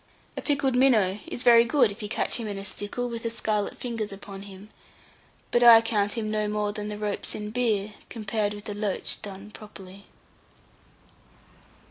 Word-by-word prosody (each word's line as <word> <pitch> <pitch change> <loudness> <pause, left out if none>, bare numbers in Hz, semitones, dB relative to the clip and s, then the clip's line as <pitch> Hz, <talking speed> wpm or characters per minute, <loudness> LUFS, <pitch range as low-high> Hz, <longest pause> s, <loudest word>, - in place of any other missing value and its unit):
A - - -4
pickled 280 -3 0
minnow 220 -7 +4
is 245 - -4
very 235 -1 +7
good 235 -2 +3
if 200 - -10
you 210 - -5
catch - - 0
him 230 -2 -4
in 205 -1 -4
a 195 - -4
stickle, 205 +5 -2
with 230 -1 -5
the 230 - -2
scarlet 215 -3 -2
fingers 230 -4 -4
upon 195 0 -8
him; 200 +1 -11 0.8
but 240 - +3
I 235 -2 +10
count 205 -3 0
him 215 -2 -2
no 215 -1 0
more 210 0 -1
than 210 0 -4
the 210 0 -5
ropes 210 -1 -3
in 210 0 -5
beer 215 -4 0 0.2
compared 210 -2 -2
with 205 - -10
a 205 - -3
loach 205 -2 -3
done 200 +1 -8
properly. 200 -2 -12
210 Hz, 180 wpm, -26 LUFS, 205-230 Hz, 0.8 s, I